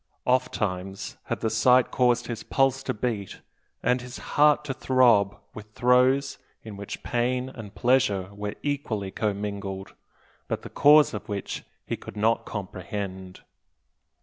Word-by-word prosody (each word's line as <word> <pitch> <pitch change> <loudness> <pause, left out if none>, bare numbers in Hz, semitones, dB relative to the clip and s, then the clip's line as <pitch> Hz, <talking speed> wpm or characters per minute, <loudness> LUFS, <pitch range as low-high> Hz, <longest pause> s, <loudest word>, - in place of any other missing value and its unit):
Ofttimes 100 -6 -1
had - - -3
the 110 - +1
sight 125 +3 +4
caused 120 -1 +2
his 115 -2 -5
pulse 135 0 +1
to - - -2
beat 105 -3 -3 0.4
and 125 0 +2
his 125 0 -8 0.2
heart 150 0 +4
to 140 - -2
throb 120 -7 +3 0.2
with 105 0 -11
throes 130 +3 +3 0.2
in 110 -2 -8
which 100 0 -7
pain 125 +2 0
and 110 -6 -10
pleasure 100 -7 +2
were 105 0 -5
equally 115 -9 -2
commingled, 100 -2 -3 0.5
but - - -3
the - - -9
cause 150 +1 +6
of 105 - -6
which 100 -2 -4 0.2
he - - -2
could - - -11
not 110 +2 +1
comprehend. 95 -1 -6
110 Hz, 140 wpm, -26 LUFS, 100-130 Hz, 0.5 s, cause